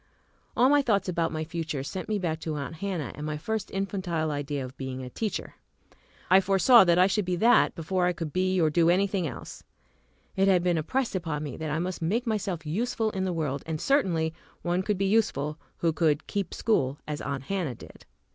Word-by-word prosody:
All 250 Hz, -, +6 dB
my 290 Hz, +1 st, +5 dB
thoughts 210 Hz, -8 st, +1 dB
about 170 Hz, -2 st, 0 dB
my 155 Hz, 0 st, -2 dB
future 160 Hz, -4 st, -4 dB
sent 180 Hz, +8 st, -5 dB
me 215 Hz, -, +1 dB
back 165 Hz, -4 st, -2 dB
to 160 Hz, -1 st, -4 dB
Aunt 145 Hz, +2 st, -5 dB
Hannah 180 Hz, -8 st, -3 dB
and 150 Hz, -, -8 dB
my 150 Hz, 0 st, -3 dB
first 220 Hz, +5 st, -3 dB
infantile 185 Hz, -5 st, -2 dB
idea 145 Hz, -1 st, -3 dB
of 130 Hz, +1 st, -10 dB
being 130 Hz, -1 st, -5 dB
a 125 Hz, -, -8 dB
teacher. 215 Hz, -, -3 dB, 0.7 s
I 190 Hz, +1 st, +6 dB
foresaw 195 Hz, +5 st, +6 dB
that 170 Hz, -1 st, +4 dB
I 180 Hz, -, +6 dB
should 200 Hz, +2 st, +1 dB
be 180 Hz, 0 st, -1 dB
that 230 Hz, +7 st, +4 dB
before 180 Hz, +2 st, 0 dB
I -, -, +3 dB
could 165 Hz, -3 st, -5 dB
be 185 Hz, 0 st, +1 dB
or 160 Hz, -2 st, +3 dB
do 165 Hz, +2 st, +4 dB
any 185 Hz, +3 st, +4 dB
thing 195 Hz, -4 st, -1 dB
else. 135 Hz, -, -8 dB, 0.7 s
It 195 Hz, 0 st, +3 dB
had 185 Hz, -3 st, +4 dB
been 175 Hz, -2 st, +2 dB
impressed 250 Hz, -, -1 dB
upon 160 Hz, -5 st, -2 dB
me 145 Hz, -4 st, -5 dB
that 160 Hz, -1 st, -4 dB
I 150 Hz, -, -1 dB
must 180 Hz, +2 st, -3 dB
make 215 Hz, +10 st, 0 dB
myself 195 Hz, -7 st, -2 dB
useful 220 Hz, +6 st, -1 dB
in 190 Hz, -1 st, -2 dB
the 185 Hz, -, -1 dB
world, 150 Hz, -5 st, -2 dB
and 160 Hz, -1 st, -2 dB
certainly 170 Hz, -, +1 dB, 0.3 s
one 175 Hz, +1 st, +1 dB
could 205 Hz, +1 st, -1 dB
be 195 Hz, -, 0 dB
useful 165 Hz, -8 st, +1 dB, 0.2 s
who 165 Hz, -1 st, +1 dB
could 155 Hz, -2 st, +1 dB
"keep 200 Hz, -4 st, -3 dB
school" 140 Hz, -, +1 dB
as 150 Hz, -1 st, -4 dB
Aunt 135 Hz, -2 st, -3 dB
Hannah 170 Hz, -6 st, -2 dB
did. -, -, -14 dB
175 Hz, 215 wpm, -27 LUFS, 155-195 Hz, 0.7 s, All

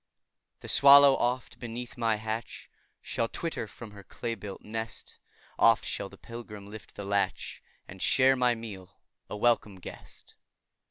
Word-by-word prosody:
The -, -, -9 dB
swallow, 140 Hz, 0 st, +8 dB
oft, 125 Hz, +1 st, -2 dB
beneath 120 Hz, 0 st, -6 dB
my 115 Hz, -3 st, +1 dB
thatch, 110 Hz, +2 st, -5 dB, 0.3 s
Shall 115 Hz, -, -1 dB
twitter 160 Hz, -5 st, -4 dB
from 110 Hz, +1 st, -11 dB
her 100 Hz, -1 st, -12 dB
clay 115 Hz, +4 st, -4 dB
built 100 Hz, -3 st, -8 dB
nest; 115 Hz, +1 st, -6 dB, 0.4 s
Oft 115 Hz, -1 st, +5 dB
shall 100 Hz, -, -3 dB
the -, -, -15 dB
pilgrim 105 Hz, -4 st, -9 dB
lift 110 Hz, 0 st, -11 dB
the 100 Hz, -, -6 dB
latch, 100 Hz, -1 st, -1 dB, 0.3 s
And 95 Hz, 0 st, -11 dB
share 135 Hz, 0 st, +5 dB
my 125 Hz, -2 st, +2 dB
meal, 100 Hz, -5 st, -10 dB, 0.3 s
a 105 Hz, -, -5 dB
welcome 110 Hz, -3 st, +2 dB
guest. -, -, -12 dB
115 Hz, 150 wpm, -29 LUFS, 105-120 Hz, 0.4 s, swallow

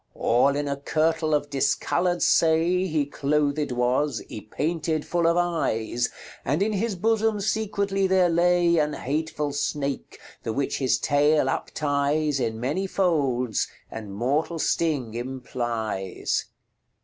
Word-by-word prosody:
All 130 Hz, +4 st, +3 dB
in 145 Hz, 0 st, -1 dB
a 140 Hz, 0 st, -2 dB
kirtle 155 Hz, +2 st, +1 dB
of 145 Hz, 0 st, -2 dB
discolourd 175 Hz, +5 st, +1 dB
say 170 Hz, +3 st, +3 dB
He 155 Hz, -4 st, 0 dB
clothed 145 Hz, 0 st, 0 dB
was, 125 Hz, +1 st, 0 dB
ypaynted 155 Hz, +8 st, -2 dB
full 170 Hz, -1 st, +1 dB
of 170 Hz, +1 st, +3 dB
eies, 125 Hz, -9 st, 0 dB, 0.3 s
And 150 Hz, +8 st, +1 dB
in 215 Hz, +1 st, 0 dB
his 205 Hz, +1 st, -1 dB
bosome 220 Hz, +2 st, +1 dB
secretly 200 Hz, -2 st, 0 dB
there 185 Hz, -1 st, +4 dB
lay 175 Hz, 0 st, +3 dB
An 150 Hz, 0 st, +1 dB
hatefull 150 Hz, +1 st, -2 dB
snake, 140 Hz, -1 st, -3 dB, 0.2 s
the 115 Hz, -, -3 dB
which 140 Hz, +2 st, -1 dB
his 130 Hz, -2 st, +2 dB
taile 145 Hz, +1 st, +3 dB
uptyes 145 Hz, +1 st, 0 dB
In 110 Hz, -3 st, -2 dB
many 150 Hz, +11 st, -1 dB
folds, 140 Hz, -, +1 dB, 0.2 s
and 110 Hz, -2 st, -7 dB
mortall 140 Hz, -, -1 dB
sting 145 Hz, -9 st, 0 dB
implyes." 120 Hz, -5 st, -3 dB
150 Hz, 125 wpm, -25 LUFS, 130-170 Hz, 0.3 s, there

